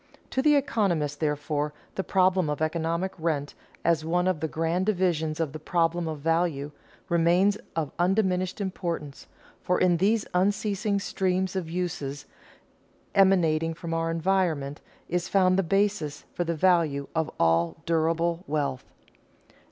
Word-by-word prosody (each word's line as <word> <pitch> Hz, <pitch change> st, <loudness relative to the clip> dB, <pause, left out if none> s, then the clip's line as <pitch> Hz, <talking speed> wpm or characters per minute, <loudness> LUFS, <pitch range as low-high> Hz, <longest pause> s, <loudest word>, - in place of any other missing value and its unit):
To 265 Hz, -, +1 dB
the 295 Hz, +1 st, +5 dB
economist, 185 Hz, -, 0 dB
therefore, 150 Hz, -1 st, -1 dB, 0.2 s
the 190 Hz, -, -2 dB
problem 185 Hz, -4 st, +2 dB
of 150 Hz, -, -2 dB
economic 165 Hz, +3 st, -1 dB
rent, 150 Hz, -3 st, -1 dB, 0.3 s
as 165 Hz, -2 st, +2 dB
one 175 Hz, +3 st, +1 dB
of 185 Hz, -4 st, +1 dB
the 160 Hz, -, -1 dB
grand 165 Hz, +5 st, -1 dB
divisions 170 Hz, -6 st, 0 dB
of 155 Hz, -4 st, -1 dB
the 155 Hz, -, -6 dB
problem 170 Hz, +1 st, 0 dB
of 155 Hz, -2 st, -5 dB
value, 165 Hz, -3 st, 0 dB, 0.4 s
remains 175 Hz, +3 st, +3 dB, 0.2 s
of 160 Hz, -4 st, -1 dB
undiminished 185 Hz, 0 st, +1 dB
importance, 170 Hz, -7 st, -4 dB, 0.3 s
for 180 Hz, -, +1 dB
in 175 Hz, -2 st, +3 dB
these 205 Hz, +4 st, +2 dB
unceasing 200 Hz, +2 st, +1 dB
streams 190 Hz, -1 st, -1 dB
of 180 Hz, -4 st, -3 dB
uses 160 Hz, -5 st, -3 dB, 0.9 s
emanating 165 Hz, -5 st, +3 dB
from 165 Hz, 0 st, -5 dB
our 165 Hz, 0 st, 0 dB
environment, 165 Hz, -4 st, 0 dB, 0.3 s
is 175 Hz, 0 st, -2 dB
found 185 Hz, -2 st, +4 dB
the 195 Hz, -, +3 dB
basis 195 Hz, -5 st, 0 dB
for 175 Hz, -, -1 dB
the 170 Hz, 0 st, -1 dB
value 160 Hz, -5 st, +2 dB
of 160 Hz, -1 st, 0 dB
all 85 Hz, 0 st, +2 dB
durable 165 Hz, +1 st, +1 dB
wealth. 145 Hz, -3 st, -2 dB
170 Hz, 140 wpm, -27 LUFS, 155-185 Hz, 0.9 s, the